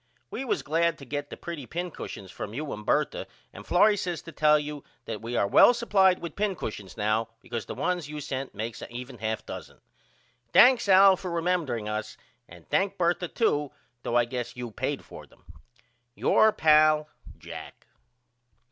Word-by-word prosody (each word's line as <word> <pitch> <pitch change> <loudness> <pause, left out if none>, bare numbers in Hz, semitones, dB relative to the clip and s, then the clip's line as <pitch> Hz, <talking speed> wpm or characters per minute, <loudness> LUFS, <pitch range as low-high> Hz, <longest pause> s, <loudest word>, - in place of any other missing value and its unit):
We - - -4
was 260 - -1
glad 165 +1 +1
to 140 - -11
get 145 +2 -4
the - - -8
pretty 160 -7 -7
pincushions 170 - -6
from 105 +2 -7
you 150 +2 -4
and 105 - -7
Bertha - - 0 0.3
and 105 - -11
Florrie 210 +4 +5
says 175 -4 -3
to 165 - -10
tell 150 0 +4
you 150 -1 -5 0.2
that 110 -1 -5
we 120 +1 -3
are - - +3
well 245 - +7
supplied 195 -6 +3
with 170 -2 -7
pincushions 160 - -4
now 110 +1 0
because 115 -1 -6
the - - -6
ones 175 -5 -2
you 150 0 -6
sent 135 -3 -5
makes 110 +2 -5
a - - -9
even 125 0 -8
half 110 0 -3
dozen. - - -9 0.7
Thanks 245 -4 +6
Al 195 0 +8
for 185 - -6
remembering 165 -10 -1
us 105 0 -4 0.3
and 85 -1 -15
thank 195 0 0
Bertha 175 0 +1
too 150 -9 0 0.3
though 120 - -3
I 120 -1 +4
guess 125 0 -5
you 120 -2 -6
paid - - -3
for - - -12
them. - - -25 0.7
Your 220 +8 +4
pal, 155 -2 +4 0.3
JACK. - - -10
150 Hz, 175 wpm, -27 LUFS, 120-180 Hz, 0.7 s, Al